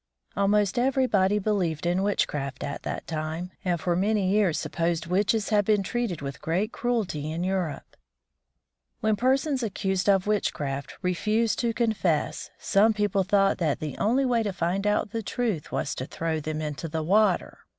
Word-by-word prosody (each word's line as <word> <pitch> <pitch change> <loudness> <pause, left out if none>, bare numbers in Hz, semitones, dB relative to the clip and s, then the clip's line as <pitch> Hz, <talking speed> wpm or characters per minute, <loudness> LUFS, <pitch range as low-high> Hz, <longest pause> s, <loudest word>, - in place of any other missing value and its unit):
Almost 200 +1 +2
everybody 245 -7 +2
believed 190 -7 0
in 175 +2 +1
witchcraft 150 -9 -1
at 140 - -4
that - - -5
time, 160 +3 -4
and 175 -3 0
for 175 +2 0
many 195 0 +1
years 200 -6 +2
supposed 165 +2 -1
witches 200 +4 +1
had 210 -2 +3
been 205 -1 +2
treated 215 - -2
with 140 0 -6
great 185 +7 0
cruelty 195 -11 -2
in 165 +2 -3
Europe. 180 -6 -3 1.1
When 215 -1 +2
persons 265 +4 +1
accused 195 -3 -1
of 195 -2 +4
witchcraft 145 -9 -2
refused 215 +5 +1
to 235 -1 +1
confess, 220 -9 0
some 215 +2 +3
people 205 -2 +1
thought 195 0 +2
that 155 -5 0
the 150 -4 -4
only 255 +6 +2
way 240 -2 +2
to 205 -3 -2
find 185 +3 -1
out 210 0 +1
the 225 - -2
truth 220 - -2
was 140 - -1
to 130 - -5
throw 160 -1 -2
them 155 +1 -4
into 150 +2 -4
the 160 0 -3
water. 210 +6 +2
195 Hz, 165 wpm, -26 LUFS, 165-215 Hz, 1.1 s, of